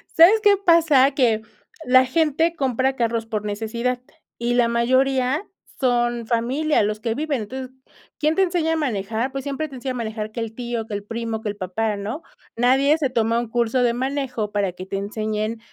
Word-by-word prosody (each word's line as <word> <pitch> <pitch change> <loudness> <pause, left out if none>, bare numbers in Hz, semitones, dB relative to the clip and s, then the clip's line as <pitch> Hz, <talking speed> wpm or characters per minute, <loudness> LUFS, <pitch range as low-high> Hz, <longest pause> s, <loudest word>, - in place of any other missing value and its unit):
¿Sabes 375 +7 +7
qué 405 -1 +6
pasa? 330 -8 +5
Que 240 -6 +2 0.4
la 255 +1 +6
gente 320 +4 +1
compra 265 -2 0
carros 230 -2 -1
por 215 -2 -4
necesidad, 235 +4 -2 0.4
y 240 +1 -1
la 240 -1 +4
mayoría 260 - +1 0.3
son 240 -2 +1
familia, 250 +5 +1
los 210 +1 -1
que 225 0 -2
viven. 290 -3 -1
Entonces, 260 +4 -7 0.5
¿quién 305 +1 +2
te 390 - +2
enseña 345 -3 0
a - - +1
manejar? 230 -3 -2
Pues, 270 -1 -5
siempre 285 +2 -3
te 270 - -10
enseña 255 +1 -4
a - - -7
manejar 220 -2 -4
que 235 - -6
el 225 -1 -4
tío, 235 -1 -4
que 215 - -8
el 205 - -4
primo, 230 0 -4
que 220 - -3
el 205 - -4
papá, 210 +3 -2
¿no? 215 +11 -5 0.3
Nadie 270 +5 +4
se 290 -4 0
toma 230 -1 +1
un 240 - -3
curso 240 +2 +1
de 240 -1 +2
manejo 255 -4 -2
para 200 -3 -1
que 185 +1 -8
te 195 +1 -4
enseñen 215 +2 -3
240 Hz, 195 wpm, -22 LUFS, 220-275 Hz, 0.5 s, Sabes